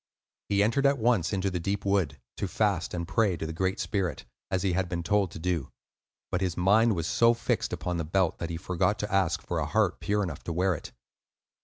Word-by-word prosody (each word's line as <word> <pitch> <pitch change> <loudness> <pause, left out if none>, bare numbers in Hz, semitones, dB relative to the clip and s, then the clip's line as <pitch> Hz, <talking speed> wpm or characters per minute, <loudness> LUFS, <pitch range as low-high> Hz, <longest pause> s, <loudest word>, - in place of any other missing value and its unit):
He 100 0 +3
entered 135 +6 +3
at 140 0 +3
once 115 -7 +2
into 95 -1 0
the 90 - -2
deep 100 +4 -2
wood 90 -8 +1 0.2
to 100 - -2
fast 100 -4 0
and 85 -1 -3
pray 100 -3 +2
to 80 - -4
the 80 - -4
Great 95 +4 -1
Spirit, 95 - -2 0.2
as 95 -1 0
he 95 -3 +1
had 90 0 0
been 85 -1 -3
told 100 0 +2
to - - -9
do. 85 -4 -1 0.6
But 90 - 0
his 90 -3 -1
mind 105 +5 +4
was 85 -3 -2
so 115 +6 +4
fixed - - -1
upon 90 -1 -2
the 85 - -1
belt 90 +1 +1
that 85 - -3
he 85 - -3
forgot 90 +4 0
to 105 -1 -4
ask 95 -4 +1
for - - -2
a - - -1
heart - - +1
pure 105 0 0
enough 85 -7 -5
to 85 - -2
wear 90 +3 +2
it. 80 - -7
95 Hz, 230 wpm, -28 LUFS, 85-100 Hz, 0.6 s, mind